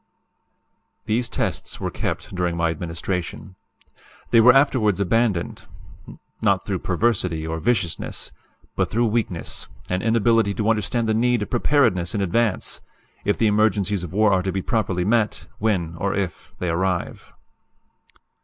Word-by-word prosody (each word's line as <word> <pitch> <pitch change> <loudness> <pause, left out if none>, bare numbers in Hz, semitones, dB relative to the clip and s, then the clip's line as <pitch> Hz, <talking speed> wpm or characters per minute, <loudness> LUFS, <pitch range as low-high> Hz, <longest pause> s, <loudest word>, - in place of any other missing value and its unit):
These 120 +3 0
tests - - -3
were - - -3
kept - - -4
during 90 -2 -1
my 85 -1 +1
administration. 85 +3 -4 0.8
They 115 - +7
were 125 +3 +8
afterwards 125 -8 +3
abandoned; 100 -2 0 0.7
not - - +2
through - - -2
perversity 90 -9 0
or 80 0 -3
viciousness; 95 -4 -1 0.4
but - - 0
through 120 +2 +1
weakness, 110 -6 -2 0.2
and 90 +1 0
inability 115 -2 +2
to 110 0 +2
understand 115 +2 0
the 110 - +2
need 120 0 +2
of - - -9
preparedness 115 - +2
in 100 - 0
advance, 105 +2 0 0.4
if 105 - +1
the 115 - +2
emergencies 105 -2 +2
of 90 - -6
war 105 +1 +3
are 95 - +3
to 95 +1 -2
be 95 0 -3
properly 95 -7 0
met, 110 0 +1
when, 95 -7 0
or 95 +4 -1
if, 95 -4 -4
they 90 - -2
arrive. 90 +1 -2
100 Hz, 145 wpm, -23 LUFS, 90-115 Hz, 0.8 s, were